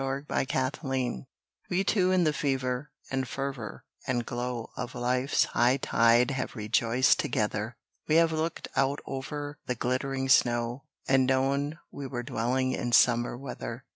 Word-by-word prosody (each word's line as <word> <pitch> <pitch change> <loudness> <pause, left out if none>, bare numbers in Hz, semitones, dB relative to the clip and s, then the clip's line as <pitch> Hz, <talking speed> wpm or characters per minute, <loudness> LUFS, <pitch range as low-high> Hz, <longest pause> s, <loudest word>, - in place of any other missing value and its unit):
TOGETHER 130 - -1 0.4
We 180 +2 +1
two 185 -3 +2
in 185 -1 +3
the 155 -2 +2
fever, 130 -1 -1 0.2
and 130 -1 -1
fervour, 135 -4 -5 0.2
and 120 -2 0
glow 120 -1 -4
Of 125 -1 -5
life's 125 +3 +2
high 125 +3 +2
tide 120 0 +3
have 130 -1 -3
rejoiced 115 +3 +2
together. 110 +1 -1 0.3
We 155 - +3
have 165 0 +5
looked 160 +1 -2
out 135 +2 +2
over 145 +2 -5
the 125 - 0
glittering 130 +2 -1
snow, 120 0 +2 0.2
And 130 -1 +4
known 140 +3 +1
we 140 -1 -6
were 120 -2 -4
dwelling 130 +3 0
in 120 -1 -2
summer 120 +1 +4
weather. 125 -1 -7
130 Hz, 140 wpm, -28 LUFS, 120-140 Hz, 0.4 s, have